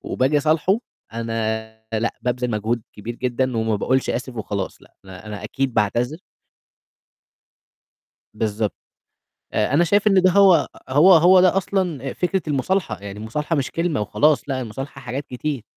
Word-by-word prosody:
وباجي 140 +3 +1
أصالحه، 160 +7 +2 0.3
أنا 115 -1 -2 0.3
لأ، 110 +1 -1
بابذل 125 0 -1
مجهود 110 +2 -1
كبير 115 +3 -7
جدًا 125 0 -1
وما 110 -1 0
باقولش 130 +5 0
آسف 125 0 -4
وخلاص، 100 -3 -4
لأ، - - -21
أنا 95 +2 -11
أنا 105 -1 -7
أكيد 135 -2 -2
باعتذر. 120 - 0 2.2
بالضبط. 110 -1 -2 0.8
آآ 105 +3 0
أنا 170 +3 +5
شايف 205 +5 +2
إن 195 -3 +5
ده 185 - +5
هو 185 -5 +5 0.2
هو 155 +8 +6
هو 180 +3 +7
ده 185 +1 +4
أصلًا 175 -9 -1
فكرة 185 +1 -1
المُصالحة، 180 +7 -1
يعني 100 0 -7
المُصالحة 150 +9 -2
مش 135 - -1
كلمة 165 -6 -1
وخلاص، 145 +8 +2
لأ 130 -1 -1
المصالحة 135 +4 -7
حاجات 140 +2 -5
كتير. 130 -1 -4
130 Hz, 150 wpm, -22 LUFS, 110-160 Hz, 2.2 s, هو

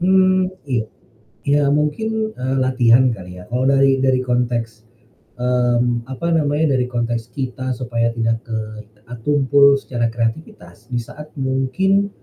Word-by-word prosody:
Mmm, 185 0 +3 0.2
iya, 120 -5 -1 0.6
ya 145 +1 +2
mungkin, 220 +9 -1
eee, 130 +1 -2
latihan 130 -1 +4
kali 90 -5 -7
ya. - - -11
Kalau 125 +2 0
dari 135 0 +4
dari 130 -1 +3
konteks, 120 -3 -2 0.5
mmm, 120 -1 +1
apa 130 +5 -5
namanya 150 -2 +2
dari 125 - 0
konteks 120 -1 -2
kita 130 -1 -3
supaya 115 -1 -1
tidak 115 -1 0
ke 115 -2 -3 0.5
e 125 0 -9
tumpul 140 +1 +4
secara 120 -3 -2
kreativitas, 115 - -5
di 125 - -4
saat 150 +6 -11
mungkin, 140 +10 +1
130 Hz, 135 wpm, -19 LUFS, 120-145 Hz, 0.6 s, latihan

